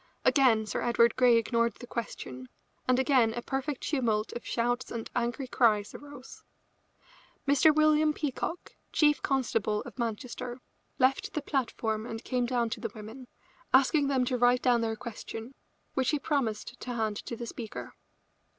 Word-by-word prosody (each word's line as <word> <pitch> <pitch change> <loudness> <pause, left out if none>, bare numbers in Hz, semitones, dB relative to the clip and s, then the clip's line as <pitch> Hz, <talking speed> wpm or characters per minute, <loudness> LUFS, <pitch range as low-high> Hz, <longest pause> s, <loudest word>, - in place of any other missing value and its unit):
Again 240 -6 +4
Sir - - -3
Edward 235 -1 +3
Grey 250 -2 +5
ignored 230 0 +1
the 245 - -10
question, 130 - -6 0.4
and 255 0 +4
again 255 -4 +3
a 240 - -3
perfect 270 +1 -3
tumult 230 -7 0
of 240 - -6
shouts 245 +2 -1
and 230 -1 -5
angry 245 +2 -1
cries 215 -5 +2
arose. 285 -2 -11 1.1
Mr. 285 +3 +6
William 310 0 +4
Peacock, 300 +3 -4 0.2
chief 295 -2 +3
constable 225 -6 0
of - - -11
Manchester, 240 +2 -4 0.4
left 265 +1 +2
the 300 - 0
platform 225 -5 -1
and 225 0 -6
came 250 -2 0
down 240 -2 0
to - - -3
the 230 0 -3
women, 220 +4 -9 0.5
asking 280 +2 +4
them 265 -2 +2
to 250 0 -1
write 245 +1 +4
their 230 -3 +2
question, 225 +1 -7 0.4
which 265 -1 +1
he 300 - +2
promised 250 -5 -2
to 245 -1 -5
hand 215 -2 -1
to 235 - -5
the 235 - -6
speaker. 230 -1 -7
245 Hz, 155 wpm, -29 LUFS, 225-270 Hz, 1.1 s, Mr